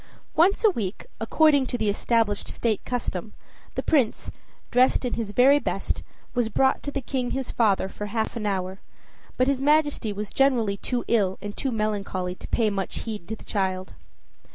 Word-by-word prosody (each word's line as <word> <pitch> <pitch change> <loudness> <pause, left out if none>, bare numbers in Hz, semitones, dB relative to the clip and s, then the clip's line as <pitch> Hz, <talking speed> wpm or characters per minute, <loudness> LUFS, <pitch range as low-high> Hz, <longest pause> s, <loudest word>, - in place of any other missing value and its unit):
Once 365 +8 +4
a 440 - +7
week, 210 - -4
according 285 +3 +4
to 245 - -2
established 210 0 +1
state 225 -3 -1
custom, 220 -5 -3 0.4
the - - -2
Prince, 270 -8 +1 0.4
dressed 255 +1 +4
in 245 - -2
his 225 -3 -2
very 265 +6 +6
best, - - -2 0.3
was 240 -3 +1
brought 265 +4 +2
to - - -4
the 280 -1 -3
King 255 -1 -2
his 265 -1 -3
father 205 -5 +2
for 210 +2 -6
half 220 +2 -2
an 215 -3 -2
hour, 190 -1 -2 0.6
but 255 - +4
his 275 -1 +1
Majesty 295 -6 +2
was 205 0 -5
generally 240 -7 +2
too 245 +4 -3
ill 200 -5 +2
and 205 +1 -6
too 270 - -2
melancholy 205 -5 -2
to - - -10
pay 220 -3 +1
much 195 -1 -3
heed 210 -6 -6
to 220 - -3
the - - -15
child. 185 -2 -2
225 Hz, 175 wpm, -25 LUFS, 205-260 Hz, 0.6 s, a